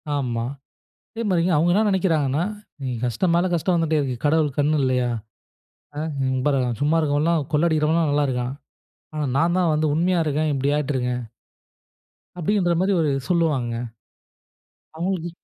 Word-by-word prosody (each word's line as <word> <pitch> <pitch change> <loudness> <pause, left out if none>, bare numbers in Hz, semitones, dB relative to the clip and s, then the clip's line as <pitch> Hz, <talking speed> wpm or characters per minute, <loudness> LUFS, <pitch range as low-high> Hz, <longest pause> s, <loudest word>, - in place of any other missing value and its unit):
ஆமா. 120 -4 -1 0.7
அதே 230 - -4
மாரிங்க 175 -1 +2
அவுங்க 170 +3 +3
என்ன 215 +4 +3
நினைக்கிறாங்கனா, 160 -6 +1 0.4
"நீங்க 130 -3 -3
கஷ்டம் 165 - 0
மேல 175 +2 +3
கஷ்டம் 175 +2 +1
வந்துடேயிருக்கு. 155 -6 0
கடவுளுக்கு 150 -2 +1
கண்ணு 150 +1 +2
இல்லையா? 125 -2 +1 0.9
ஆ. - - -3 0.3
இங்க 130 0 0
பாருங்க, 130 -4 +2
சும்மா 150 +3 +3
இருக்கிறவன் 145 -1 +1
எல்லாம் 165 -4 +1
கொள்ள 150 +3 +3
அடிக்கிறவன்லாம் 155 0 +2
நல்லா 145 0 +2
இருக்கான். 125 0 -2 0.6
ஆனா 150 -1 -1
நான் 170 +3 +2
தான் 175 -3 +2
வந்து 155 +1 +1
உண்மையா 175 +2 +2
இருக்கேன் 155 +1 0
இப்படி 135 +1 0
ஆயிட்டிருக்கேன்." 130 -4 -1 1.1
அப்படின்ற 180 0 +1
மாரி 195 - +2
ஒரு 150 -3 +1 0.2
சொல்லுவாங்க. 155 -9 +1 1.2
அவங்களுக்கு 175 0 -2
155 Hz, 145 wpm, -23 LUFS, 135-170 Hz, 1.2 s, அவுங்க